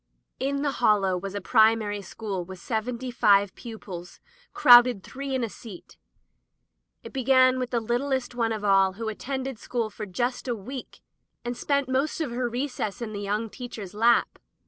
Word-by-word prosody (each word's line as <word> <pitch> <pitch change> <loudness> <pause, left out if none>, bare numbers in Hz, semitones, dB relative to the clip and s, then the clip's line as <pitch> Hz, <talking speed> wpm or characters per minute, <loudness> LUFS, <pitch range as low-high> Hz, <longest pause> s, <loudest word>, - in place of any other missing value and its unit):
In 280 +2 -1
the 285 - +1
Hollow 205 -7 +2
was 195 +2 -5
a 205 - -3
primary 220 -1 +3
school 195 -1 -5
with 190 +2 -10
seventy 235 +5 -3
five 200 -5 +4
pupils, 195 -7 -9 0.3
crowded 240 -4 +7
three 275 0 -5
in 255 - -1
a - - 0
seat. 205 -4 -12 1.1
It - - -10
began 260 -1 +4
with 250 -1 -2
the 240 - 0
littlest 245 +3 -1
one 230 -2 0
of 215 -2 -3
all 195 -2 +4
who 220 +3 -5
at 215 - -7
tended 265 -2 -4
school 230 -3 -3
for 210 0 -7
just 245 +8 -2
a 240 - 0
week, 245 +5 -9 0.4
and 240 0 -3
spent 280 +1 0
most 265 +5 0
of 305 -7 -2
her 245 0 -1
recesses 240 -3 -3
in 215 -2 -6
the 205 - -5
young 210 +3 -1
teacher's 220 -5 -8
lap. 230 +3 +2
235 Hz, 175 wpm, -26 LUFS, 205-255 Hz, 1.1 s, crowded